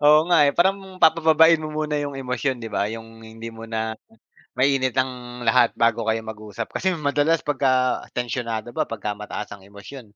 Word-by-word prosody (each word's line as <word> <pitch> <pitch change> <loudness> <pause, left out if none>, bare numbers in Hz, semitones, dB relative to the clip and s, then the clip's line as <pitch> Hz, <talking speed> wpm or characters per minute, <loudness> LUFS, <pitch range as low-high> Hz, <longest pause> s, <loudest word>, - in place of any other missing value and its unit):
Oo 150 +1 +8
nga, 175 -2 +5
eh. 140 - +3
Parang 190 +2 0
papababain 160 0 +6
mo 155 - -5
muna 150 0 -2
'yong 145 -2 -3
emosyon, 130 0 -2
'di 115 - -6
ba. 100 - -1
'Yong 115 +1 -9
hindi 115 +1 -9
muna 110 -1 -4 0.6
mainit 130 -1 +2
ang 125 -2 -3
lahat 120 +1 +3
bago 115 -1 +1
kayo 110 0 0
mag-usap. 110 0 -7
Kasi 185 -1 0
madalas 150 +1 +1
'pagka 130 -3 +1 0.2
tensyonado 120 -2 -3
ba, - - -1
pagkamataas 105 -1 -5
ang 100 -1 -11
emosyon 105 +2 -12
125 Hz, 165 wpm, -23 LUFS, 110-145 Hz, 0.6 s, Oo